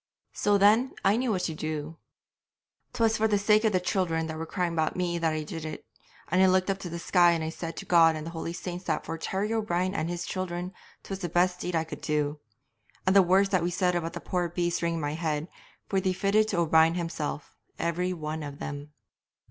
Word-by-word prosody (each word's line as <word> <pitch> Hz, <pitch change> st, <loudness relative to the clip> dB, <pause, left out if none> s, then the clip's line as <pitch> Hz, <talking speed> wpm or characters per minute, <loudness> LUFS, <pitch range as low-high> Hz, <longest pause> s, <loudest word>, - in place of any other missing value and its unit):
'So 205 Hz, 0 st, +2 dB
then, 215 Hz, +6 st, +4 dB
I 195 Hz, +2 st, +5 dB
knew 250 Hz, +1 st, 0 dB
what 185 Hz, -3 st, 0 dB
I -, -, -3 dB
would 155 Hz, -, -9 dB
do. 155 Hz, 0 st, -4 dB, 0.9 s
'Twas 225 Hz, -1 st, +2 dB
for 220 Hz, -, +3 dB
the 210 Hz, -1 st, +2 dB
sake 210 Hz, +2 st, +3 dB
of 220 Hz, -, +3 dB
the 185 Hz, -, +2 dB
children 180 Hz, -3 st, 0 dB
that 160 Hz, 0 st, -5 dB
were 165 Hz, -, -4 dB
crying 180 Hz, -1 st, -1 dB
about 160 Hz, -1 st, 0 dB
me 175 Hz, -1 st, -1 dB
that 165 Hz, -1 st, +1 dB
I 155 Hz, 0 st, -2 dB
did 160 Hz, +1 st, -6 dB
it, 155 Hz, -1 st, -6 dB, 0.4 s
and 185 Hz, +4 st, +3 dB
I 190 Hz, -, +7 dB
looked 185 Hz, +1 st, +3 dB
up 195 Hz, -, -3 dB
to 180 Hz, -, -6 dB
the 170 Hz, -, -5 dB
sky 175 Hz, 0 st, +4 dB
and 165 Hz, -1 st, -1 dB
I 160 Hz, -, -2 dB
said 165 Hz, 0 st, -6 dB
to -, -, -6 dB
God 165 Hz, -2 st, +5 dB
and 155 Hz, 0 st, -5 dB
the 165 Hz, -, -5 dB
holy 165 Hz, 0 st, -4 dB
saints 180 Hz, +1 st, -6 dB
that 155 Hz, -, -1 dB
for 165 Hz, -, -4 dB
Terry 200 Hz, +6 st, -2 dB
O'Brien 185 Hz, -4 st, 0 dB
and 160 Hz, -3 st, -2 dB
his 175 Hz, 0 st, -3 dB
children 180 Hz, 0 st, -4 dB, 0.3 s
'twas 195 Hz, -1 st, -5 dB
the 175 Hz, -3 st, -3 dB
best 180 Hz, +2 st, +2 dB
deed 180 Hz, -, -3 dB
I 160 Hz, -, +2 dB
could 155 Hz, -2 st, -9 dB
do; 150 Hz, 0 st, -1 dB, 0.7 s
and 185 Hz, -, +3 dB
the 200 Hz, -, +9 dB
words 190 Hz, +2 st, +3 dB
that 185 Hz, -3 st, +2 dB
we 175 Hz, -, 0 dB
said 180 Hz, 0 st, +1 dB
about 170 Hz, -1 st, -2 dB
the -, -, -6 dB
poor 180 Hz, -2 st, -1 dB
beast 175 Hz, 0 st, -1 dB
rang 170 Hz, 0 st, 0 dB
in -, -, -2 dB
my 145 Hz, -1 st, -2 dB
head, 155 Hz, -1 st, -2 dB, 0.4 s
for 195 Hz, -1 st, +1 dB
they 185 Hz, 0 st, +1 dB
fitted 205 Hz, +3 st, +2 dB
to 200 Hz, -, -2 dB
O'Brien 165 Hz, 0 st, +4 dB
himself, 165 Hz, -4 st, -4 dB, 0.2 s
every 175 Hz, +2 st, -1 dB
one 155 Hz, -2 st, -4 dB
of 145 Hz, -1 st, -7 dB
them. 145 Hz, +1 st, -7 dB
175 Hz, 240 wpm, -28 LUFS, 160-190 Hz, 0.9 s, the